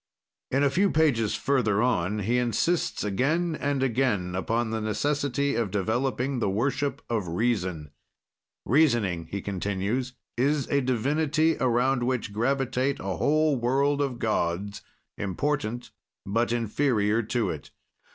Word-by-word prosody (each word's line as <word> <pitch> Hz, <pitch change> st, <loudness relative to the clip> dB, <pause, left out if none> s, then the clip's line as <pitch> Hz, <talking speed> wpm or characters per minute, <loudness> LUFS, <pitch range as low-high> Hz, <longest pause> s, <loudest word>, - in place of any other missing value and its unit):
In 135 Hz, +2 st, +1 dB
a 140 Hz, -, +3 dB
few 195 Hz, +7 st, +3 dB
pages 140 Hz, -, +2 dB
further 120 Hz, -7 st, +1 dB
on 105 Hz, -4 st, 0 dB
he 120 Hz, +3 st, +2 dB
insists 125 Hz, -, 0 dB
again 155 Hz, -, 0 dB
and 140 Hz, -2 st, -1 dB
again 115 Hz, -8 st, 0 dB
upon 115 Hz, +5 st, -1 dB
the 110 Hz, 0 st, -2 dB
necessity 140 Hz, +4 st, 0 dB
of 115 Hz, -4 st, 0 dB
developing 120 Hz, +6 st, -1 dB
the 105 Hz, -, +1 dB
worship 135 Hz, +6 st, -1 dB
of 110 Hz, -6 st, -1 dB
reason. 90 Hz, -, -1 dB, 0.7 s
"Reasoning," 115 Hz, -, +2 dB
he 100 Hz, -1 st, -4 dB
continues, 100 Hz, +6 st, -2 dB, 0.2 s
"is 140 Hz, +2 st, +1 dB
a 140 Hz, -, +2 dB
divinity, 150 Hz, +6 st, +1 dB
around 125 Hz, +1 st, +2 dB
which 120 Hz, -4 st, -1 dB
gravitate 130 Hz, +3 st, 0 dB
a 95 Hz, -3 st, -3 dB
whole 155 Hz, -, +2 dB
world 140 Hz, +4 st, +1 dB
of 135 Hz, -4 st, -1 dB
gods, 100 Hz, -2 st, -1 dB, 0.4 s
important 120 Hz, +4 st, -2 dB, 0.3 s
but 115 Hz, +4 st, 0 dB
inferior 115 Hz, -2 st, +1 dB
to 110 Hz, -2 st, -1 dB
it. 75 Hz, -1 st, -8 dB
120 Hz, 130 wpm, -26 LUFS, 105-140 Hz, 0.7 s, a